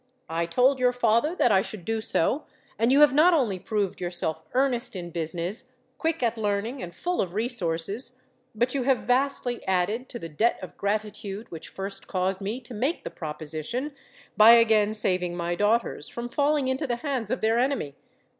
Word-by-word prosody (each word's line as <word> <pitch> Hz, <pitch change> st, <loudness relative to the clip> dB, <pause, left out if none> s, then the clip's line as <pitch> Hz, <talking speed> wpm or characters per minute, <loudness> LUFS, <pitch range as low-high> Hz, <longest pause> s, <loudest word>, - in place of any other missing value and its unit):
I 165 Hz, +1 st, -1 dB
told 255 Hz, +9 st, +3 dB
your 250 Hz, 0 st, +3 dB
father 240 Hz, +6 st, +2 dB
that 245 Hz, -, +3 dB
I 190 Hz, -, +5 dB
should 195 Hz, -3 st, -8 dB
do 225 Hz, 0 st, -1 dB
so; 240 Hz, -, 0 dB, 0.3 s
and 230 Hz, +2 st, +3 dB
you 280 Hz, +2 st, +5 dB
have 295 Hz, -2 st, +7 dB
not 330 Hz, +5 st, +6 dB
only 225 Hz, -, +1 dB
proved 205 Hz, -2 st, -2 dB
yourself 175 Hz, -3 st, -2 dB
earnest 255 Hz, -5 st, +1 dB
in 175 Hz, -2 st, -6 dB
business, 175 Hz, +9 st, -3 dB, 0.3 s
quick 325 Hz, -4 st, -1 dB
at 230 Hz, -1 st, 0 dB
learning, 215 Hz, +5 st, -1 dB
and 175 Hz, -1 st, -7 dB
full 355 Hz, -, -1 dB
of 180 Hz, -1 st, -4 dB
resources, 220 Hz, +2 st, -2 dB, 0.4 s
but 240 Hz, +3 st, +1 dB
you 275 Hz, -, 0 dB
have 260 Hz, 0 st, +1 dB
vastly 250 Hz, -1 st, +1 dB
added 190 Hz, +7 st, 0 dB
to 240 Hz, -, -5 dB
the 165 Hz, -, -6 dB
debt 190 Hz, +10 st, +1 dB
of 185 Hz, -, -9 dB
gratitude 210 Hz, +1 st, -3 dB
which 165 Hz, -2 st, -8 dB
first 195 Hz, +1 st, -6 dB
caused 190 Hz, +1 st, -1 dB
me 210 Hz, +5 st, -3 dB
to 245 Hz, 0 st, -11 dB
make 260 Hz, +10 st, -1 dB
the -, -, -6 dB
proposition, 155 Hz, -, -4 dB, 0.4 s
by 220 Hz, +2 st, +9 dB
again 220 Hz, -2 st, +4 dB
saving 180 Hz, -4 st, 0 dB
my 170 Hz, 0 st, -1 dB
daughters 205 Hz, -3 st, 0 dB
from 240 Hz, 0 st, -6 dB
falling 290 Hz, 0 st, +1 dB
into 260 Hz, +3 st, -1 dB
the 240 Hz, -, 0 dB
hands 260 Hz, -7 st, -1 dB
of 255 Hz, -, -2 dB
their 225 Hz, +2 st, +2 dB
enemy. 255 Hz, -, 0 dB
220 Hz, 185 wpm, -26 LUFS, 185-255 Hz, 0.4 s, by